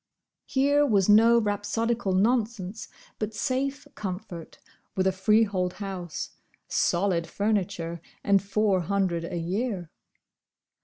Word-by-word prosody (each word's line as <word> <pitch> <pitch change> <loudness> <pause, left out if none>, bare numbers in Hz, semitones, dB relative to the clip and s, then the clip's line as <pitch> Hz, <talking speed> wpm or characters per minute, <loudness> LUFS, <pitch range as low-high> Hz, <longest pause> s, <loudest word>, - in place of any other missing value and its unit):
Here 285 +2 +3
was 205 -9 +3
no 225 +3 +6
rhapsodical 215 0 -1
nonsense, 215 -1 0 0.3
but 215 0 -3
safe 270 +5 -2
comfort, 185 -4 -6 0.4
with 185 - +1
a 190 - +4
freehold 190 -1 +2
house, 190 -5 -5 0.4
solid 175 -2 +1
furniture, 185 -4 -1 0.2
and 200 -1 +4
Four 200 -1 +1
hundred 180 -2 0
a 175 0 -4
year. 185 0 -2
200 Hz, 105 wpm, -27 LUFS, 185-225 Hz, 0.4 s, no